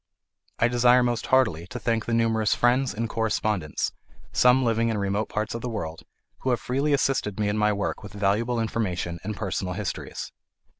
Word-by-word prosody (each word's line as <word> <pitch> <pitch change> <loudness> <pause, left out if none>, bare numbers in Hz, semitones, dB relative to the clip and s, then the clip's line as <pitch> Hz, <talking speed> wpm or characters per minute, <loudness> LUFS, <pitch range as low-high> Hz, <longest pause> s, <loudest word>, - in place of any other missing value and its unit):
I 115 - +4
desire 120 +1 +5
most 120 -3 -1
heartily 105 -11 +2
to 125 - -6
thank 115 -2 -1
the 120 - 0
numerous 110 -2 +2
friends 125 +2 +2
and 115 +2 -2
correspondents, 105 -7 -1 0.4
some 125 +1 +5
living 115 0 +2
in 110 - -1
remote 100 +2 -1
parts 105 0 -2
of 115 - -4
the 125 - -3
world, 85 -8 -5 0.4
who 130 - -2
have 125 - +2
freely 140 +4 0
assisted 135 -7 +1
me 105 - +1
in 105 - 0
my 105 0 +3
work 100 -1 -2
with 100 - -10
valuable 105 +4 +1
information 90 -7 -2
and 105 +1 -4
personal 95 -3 -2
histories. 105 -2 -5
110 Hz, 185 wpm, -26 LUFS, 100-120 Hz, 0.4 s, desire